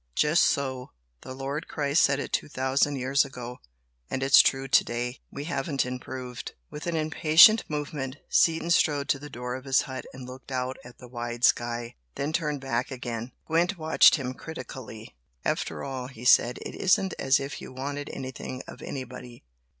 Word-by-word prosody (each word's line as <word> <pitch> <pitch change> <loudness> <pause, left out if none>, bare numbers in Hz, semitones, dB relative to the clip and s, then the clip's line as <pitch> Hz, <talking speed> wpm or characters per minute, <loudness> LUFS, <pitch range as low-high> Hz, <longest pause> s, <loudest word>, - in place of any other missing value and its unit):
"Just 150 +3 +4
so! 130 -2 -1 0.3
The 130 - -8
Lord 140 +3 -4
Christ 145 +1 +1
said 140 0 +3
it - - -5
two - - 0
thousand 135 +1 +1
years 135 +2 +2
ago, 125 -2 -8 0.5
and 130 - -2
it's 135 0 +8
true 135 0 0
to - - +5
day! 120 +2 -4
We 140 - -6
haven't 140 -3 -1
improved!" 125 -1 -6 0.2
With 150 - -7
an 170 - -1
impatient 160 +7 +6
movement, 145 -3 -4
Seaton 165 +1 +2
strode 145 -4 +3
to 140 - +2
the 145 +1 -9
door 125 -1 -5
of 130 +1 -7
his 135 -1 +3
hut 130 -2 -7
and 130 -1 -9
looked 130 +2 -11
out 130 0 -2
at 120 -1 -13
the 125 - -12
wide 120 0 -6
sky, 120 -1 +2 0.2
then 145 +3 -2
turned 150 -4 -1
back 125 -2 -1
again. 120 -2 -5
Gwent 175 +4 +1
watched 160 -1 +6
him 130 -3 -3
critically. 130 - -9 0.3
"After - - -2
all," 130 -2 -4
he 125 -2 -11
said, 125 -1 +5
"It - - -6
isn't 190 0 +2
as 135 +1 +3
if 140 +1 -6
you - - -9
wanted 140 +2 -5
anything 130 -1 -6
of - - -11
anybody. 125 -2 -8
135 Hz, 180 wpm, -27 LUFS, 125-145 Hz, 0.5 s, it's